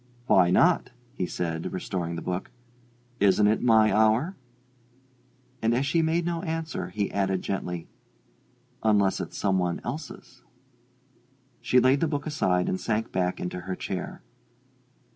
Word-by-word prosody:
"Why 90 -7 +5
not?" 170 - +3 0.2
he 90 - -2
said, 80 -2 -3
restoring 90 -2 -3
the - - -6
book. 90 +1 -3 0.7
"Isn't 100 +1 +4
it 105 +2 +3
my 110 -3 +4
hour?" 110 - +3 1.3
And 115 +1 +2
as 130 +3 +1
she 165 +4 +2
made 165 +1 +1
no 170 -1 -2
answer, 165 -2 -3
he 105 -2 -2
added 95 -2 0
gently, 90 -3 -4 0.9
"Unless 100 -3 +2
it's - - -6
some 95 -2 +1
one 90 -1 -1
else's?" 140 +7 -7 1.2
She 125 - +4
laid 130 +3 +4
the 165 - +1
book 145 -2 -3
aside 95 - +1
and 95 - -2
sank 110 0 -1
back 90 -1 -1
into 90 0 -4
her 95 +1 -5
chair. 95 -1 -5
105 Hz, 145 wpm, -26 LUFS, 90-135 Hz, 1.3 s, Why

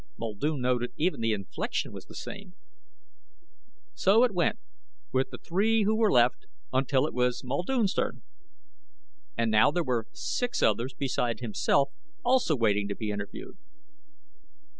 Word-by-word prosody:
Muldoon 125 +6 -2
noted 125 -1 0
even 170 -5 0
the 115 0 +1
inflection 100 -3 -3
was - - -9
the - - -13
same. 190 -2 -8 1.4
So 210 +5 +4
it 245 -4 +2
went 180 +5 +1 0.6
with 130 +1 +1
the - - -8
three 215 +5 +1
who 215 +2 +2
were 220 -1 +3
left, 120 0 +3 0.3
until 130 +1 +2
it - - -4
was 125 0 0
Muldoon's 185 - 0
turn. - - -2 1.1
And 115 - +1
now 110 +6 +6
there 170 +4 0
were 120 -5 -1
six 245 -1 -2
others 125 +3 +1
beside 125 -3 -1
himself 130 +4 +1 0.4
also 245 -10 +3
waiting 105 -4 +1
to 100 - -3
be 110 -2 -3
interviewed. 100 -1 -7
130 Hz, 140 wpm, -28 LUFS, 115-185 Hz, 1.4 s, now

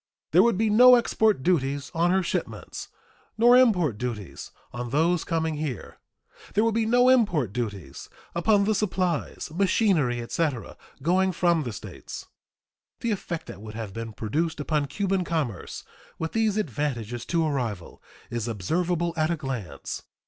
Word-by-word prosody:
There - - +7
would 235 -5 +3
be 220 0 +2
no 250 +4 +8
export 220 - +2
duties 140 -4 0
on 170 +1 +2
her 190 +1 +2
shipments - - -4 0.5
nor 240 +2 +6
import 180 - +4
duties 115 -6 -5 0.2
on 120 0 -4
those 165 +5 +2
coming 160 -2 -1
here. 145 -7 -5 0.6
There 210 - +4
would 230 -1 +2
be 225 0 +1
no 245 +2 +4
import 180 - +3
duties 100 - -5 0.2
upon 200 +4 +3
the 215 +2 +2
supplies, 185 -7 -1
machinery, 180 - +2
etc., 130 +1 -2 0.3
going 185 +3 +2
from 170 -1 +2
the 125 -5 -4
States. 100 - -8 0.8
The 235 - 0
effect 175 -5 -4
that - - -10
would 110 0 -9
have 110 -4 -6
been 115 +1 -5
produced 155 - -2
upon 145 -1 0
Cuban 195 +5 -1
commerce, 150 - -3 0.3
with 160 0 -3
these 220 -2 +1
advantages 125 - -2
to 165 -2 +1
a 155 - 0
rival, 115 -10 -4 0.3
is 120 -1 -2
observable 170 - -1
at 155 -1 +1
a 170 - 0
glance. 120 - -5
160 Hz, 155 wpm, -26 LUFS, 120-190 Hz, 0.8 s, no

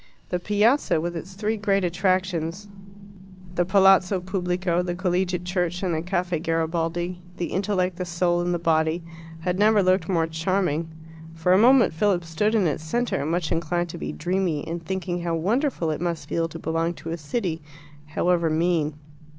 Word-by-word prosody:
The 180 - -1
Piazza, 210 - +2
with 175 +2 -3
its 180 +3 -7
three 215 +3 -1
great 200 -2 +1
attractions 185 0 0 0.9
the 175 - +2
Palazzo 190 0 +5
Pubblico, 180 -1 -1
the 175 -1 -3
Collegiate 180 -1 -1
Church, 180 0 -1
and 180 -3 0
the 160 - -1
Caffe 175 -1 -1
Garibaldi: 165 +2 -1 0.2
the 175 - -3
intellect, 185 -2 0
the 180 - -3
soul, 175 0 +1
and 175 0 -1
the 175 - +1
body 165 0 +1 0.4
had 180 +2 -1
never 210 -1 +5
looked 185 -2 +2
more 165 -3 +2
charming. 165 -1 -1 0.5
For 165 +3 +2
a - - +6
moment 250 -3 +6
Philip 175 0 +1
stood 210 +7 0
in 205 -4 +3
its 155 -1 -1
centre, 235 -1 -1
much 170 0 -1
inclined 175 +1 -1
to - - -7
be 75 0 -4
dreamy, 175 - -1
and 165 +1 -4
thinking 175 0 -3
how 170 -1 -1
wonderful 200 - 0
it 155 - -4
must 170 -4 -2
feel 165 +1 0
to 165 - -8
belong 165 +1 -1
to 165 - -7
a - - -1
city, 165 +1 -3 0.5
however 170 +1 +1
mean. 160 -2 +1
175 Hz, 175 wpm, -24 LUFS, 165-190 Hz, 0.9 s, a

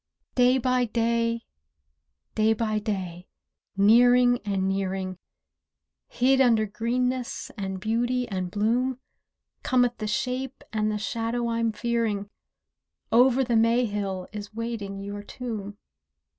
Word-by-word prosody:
Day 250 +1 +4
by 255 0 +1
day, 230 0 0 0.9
day 220 +1 +3
by 215 -1 -1
day, 185 -4 -4 0.5
nearing 245 +4 +5
and 195 -2 -1
nearing, 190 -1 -2 0.9
Hid 265 +2 +3
under 230 -4 +4
greenness, 245 +4 -2
and 190 -3 -4
beauty 240 +4 0
and 185 -4 -3
bloom, 235 +6 0 0.6
Cometh 245 -3 +2
the 215 - -3
shape 255 +5 -3
and 215 0 +1
the 210 - -1
shadow 230 +2 -2
I'm 230 -1 0
fearing, 220 -3 -1 0.8
"Over 255 +3 +5
the 240 -2 0
May 230 +2 +4
hill" 195 -3 -3
is 210 0 -8
waiting 225 -4 -4
your 205 +1 -6
tomb. 210 -2 -6
230 Hz, 115 wpm, -26 LUFS, 205-245 Hz, 0.9 s, nearing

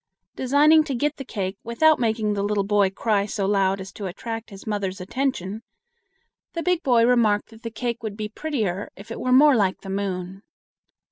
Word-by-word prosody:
Designing 295 +4 +5
to 280 -4 -3
get 295 +4 -1
the 270 - -6
cake 195 -5 -4
without 310 +7 +3
making 220 -3 0
the 200 - -1
little 205 0 0
boy 200 -1 +3
cry 205 +1 0
so 200 -1 -2
loud 195 -1 +2
as 190 0 -8
to 200 -1 -6
attract 225 +5 -6
his 195 -2 -12
mother's 200 -2 -3
attention, 210 -1 -2 0.9
the 335 - -3
big 360 0 +1
boy 240 -5 +4
remarked 225 -4 +2
that 225 0 -15
the 230 - -5
cake 235 +1 -4
would 215 -2 -5
be 215 -1 -3
prettier 215 - -3
if 205 +4 -12
it - - -5
were 255 - -1
more 280 +2 +7
like 195 -4 +1
the 195 - -7
moon. 190 -1 -3
215 Hz, 195 wpm, -24 LUFS, 195-250 Hz, 0.9 s, more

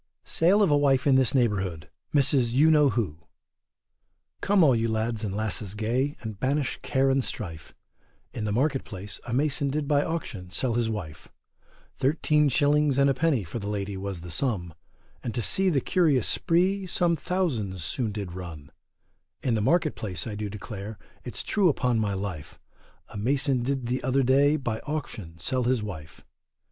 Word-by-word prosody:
SALE 190 +6 +3
OF 185 - +3
A 145 - +5
WIFE 135 -3 +2
IN 140 - +5
THIS 130 -1 +3
NEIGHBOURHOOD 95 - 0 0.2
MRS. 135 -4 +3
YOU 150 +5 +5
KNOW 150 -2 +5
WHO. 105 - -2 1.2
Come 195 -2 +4
all 135 -5 +5
you 115 0 0
lads 110 0 -1
and 105 - -2
lasses 105 0 -2
gay, 125 +7 0
and 110 -4 -7
banish 140 0 0
care 135 -1 +1
and 135 0 +2
strife, 85 -11 -7 0.6
In 110 - -4
the 105 - -1
market 135 +5 +1
place, 100 +1 -7
a 120 - -3
mason 140 0 +1
did 145 +1 -2
by 145 0 +3
auction 115 - -5
sell 115 +7 -1
his 115 -1 0
wife; 90 -8 -6 0.7
Thirteen 150 +1 +2
shillings 145 0 +2
and 140 0 +4
a - - +2
penny 140 -5 +1
for 90 +7 -6
the 100 - -5
lady 100 -1 -3
was 95 -2 -5
the 85 0 -8
sum, 90 - -1 0.5
And 115 - -4
to 120 - 0
see 190 - +4
the 145 -6 +1
curious 150 - +2
spree, 185 +3 +1
some 175 -1 +1
thousands 125 - -2
soon 110 - -1
did 100 -4 -5
run; 80 -5 -8 0.7
In 125 - +1
the 110 - +1
market 155 +6 +2
place, 95 -5 -5
I 110 - -5
do 105 0 -4
declare, 105 +1 -7 0.3
it's - - -5
true 200 -4 +2
upon 125 -5 +1
my 105 -2 0
life, 95 -6 -6 0.5
A - - -9
mason 130 +3 +1
did 130 0 -2
the 125 +2 -1
other 130 +2 +1
day, 140 +4 +4
by 120 -7 -3
auction 110 - -6
sell 125 - -1
his 125 -3 +1
wife. 80 -8 -8
125 Hz, 180 wpm, -26 LUFS, 105-145 Hz, 1.2 s, A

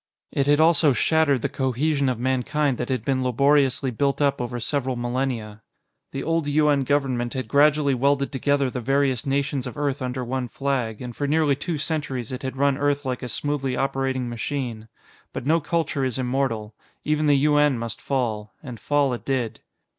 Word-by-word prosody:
It 140 0 0
had 145 +1 +4
also 160 -3 +5
shattered 145 -2 +2
the - - +2
cohesion 140 +1 0
of 125 - -1
Mankind 130 +2 0
that 120 - -3
had 125 -4 -2
been 130 -1 +1
laboriously 135 +1 +2
built 140 +4 0
up 140 -3 +1
over 120 0 -3
several 130 +1 -1
millennia. 120 -3 -3 0.5
The 135 - -4
old 165 -2 0
U.N. 145 -2 +3
government 130 -4 0
had 130 -3 -3
gradually 145 +2 +4
welded 140 +2 +1
together 140 -1 +1
the 125 - -4
various 135 0 +1
nations 140 -1 -1
of - - -8
Earth 145 -1 -1
under 125 0 -3
one 130 +1 -2
flag, 130 -5 -2
and 120 -1 -7
for 145 - -2
nearly 150 -1 +2
two 165 +3 -3
centuries 140 -6 -3
it 130 - -5
had 130 0 -5
run 140 0 +2
Earth 145 0 0
like 130 -1 -2
a 125 - -5
smoothly 135 +2 -1
operating 135 -2 -1
machine. 120 -2 -4 0.5
But - - -5
no 160 +3 +3
culture 160 -2 -1
is 130 -1 -1
immortal; 125 -4 -1 0.3
even 150 0 +1
the 145 -1 +5
U.N. 145 -1 +3
must 115 0 -5
fall, 110 -6 -2
and 125 -5 -8
fall 145 -3 +1
it 120 - -5
did. 125 -5 -2
135 Hz, 185 wpm, -24 LUFS, 125-145 Hz, 0.5 s, also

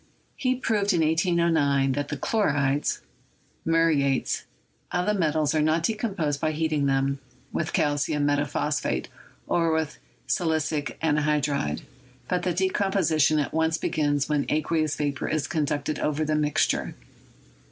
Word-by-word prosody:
He 255 -1 0
proved, 210 -5 +1
in 170 - +2
1809, 160 -4 +2
that 145 +2 -2
the - - -4
chlorides 145 -9 0 0.6
(muriates) 160 -5 +1 0.5
of 180 0 0
the 210 - +2
met 165 -7 +1
als 155 -2 +1
are 155 - +2
not 155 +2 +2
decomposed 190 -9 -1
by 155 -1 0
heating 155 -2 0
them 135 0 +1 0.3
with 160 - -1
calcium 145 0 +1
metaphosphate 145 +1 0 0.4
or 165 -1 +1
with 160 -1 -1 0.3
silicic 155 -5 -1
anhydride, 150 - +1 0.5
but 180 -1 0
that 175 -1 -2
decom 190 +1 +1
position 155 -5 +3
at 145 - -1
once 160 0 +1
begins 145 -3 0
when 150 -1 0
aqueous 155 0 0
vapor 145 -2 -2
is 155 -3 0
conducted 150 -1 -1
over 155 +1 0
the 155 - 0
mixture. 150 -1 +1
155 Hz, 135 wpm, -26 LUFS, 145-165 Hz, 0.6 s, position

